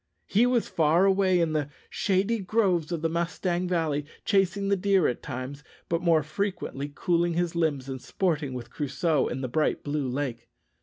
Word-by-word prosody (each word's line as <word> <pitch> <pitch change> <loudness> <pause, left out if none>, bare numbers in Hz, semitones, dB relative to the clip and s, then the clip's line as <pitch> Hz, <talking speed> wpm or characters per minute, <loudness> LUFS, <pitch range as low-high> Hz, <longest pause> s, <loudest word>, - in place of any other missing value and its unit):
He 225 +5 +3
was 245 -2 +1
far 170 0 +3
away 190 -2 +3
in 165 -2 +1
the 150 -2 -1 0.2
shady 200 +4 +1
groves 185 -5 +1
of 165 -2 -3
the - - +3
Mustang 175 +2 -1
Valley, 155 -5 0 0.2
chasing 195 0 +2
the 200 - +4
deer 195 -2 +3
at 125 - -2
times, 130 +2 -6 0.3
but 170 0 0
more 165 -3 +3
frequently 150 -4 -3
cooling 170 0 +1
his 175 -1 0
limbs 155 -6 0
and 130 -2 -5
sporting 150 -8 -1
with 120 -1 -7
Crusoe 150 0 0
in 130 - -4
the 130 - -2
bright 150 +5 0
blue 145 -1 -1
lake. 125 -3 -3
165 Hz, 175 wpm, -27 LUFS, 145-185 Hz, 0.3 s, the